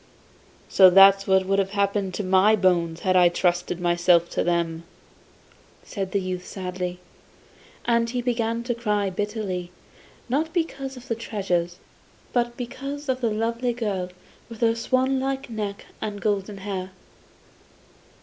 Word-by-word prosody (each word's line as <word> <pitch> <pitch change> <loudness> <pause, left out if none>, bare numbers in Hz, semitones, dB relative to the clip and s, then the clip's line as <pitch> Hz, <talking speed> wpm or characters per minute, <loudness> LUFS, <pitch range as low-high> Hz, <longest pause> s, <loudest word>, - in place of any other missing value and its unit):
'So 190 -1 +7
that's 195 +1 +7
what 190 -1 +3
would 195 +1 +1
have 195 -1 0
happened 200 -1 +1
to 205 - -4
my 190 +3 +4
bones 170 -4 +1
had 185 -1 +1
I 180 -1 +6
trusted 175 0 0
myself 175 0 +3
to - - 0
them,' 170 -1 -1 1.0
said 195 -2 -5
the 200 - +1
youth 185 -1 -4
sadly; 180 -1 -5 0.9
and 235 -1 +2
he 250 +1 -2
began 235 -1 -1
to 240 0 -1
cry 210 -4 -1
bitterly, 200 -3 -3 0.6
not 300 +6 0
because 275 -6 -3
of 250 - -12
the - - 0
treasures, 180 -6 -2 0.6
but 240 -1 0
because 275 +4 -6
of 260 0 0
the 235 - +1
lovely 230 +3 -1
girl 200 -6 -2 0.4
with 230 -1 -10
her 230 -1 +4
swanlike 265 +2 -1
neck 210 -2 -4 0.2
and 210 -1 -4
golden 200 -1 -1
hair. 190 -1 -4
200 Hz, 140 wpm, -24 LUFS, 185-235 Hz, 1.0 s, So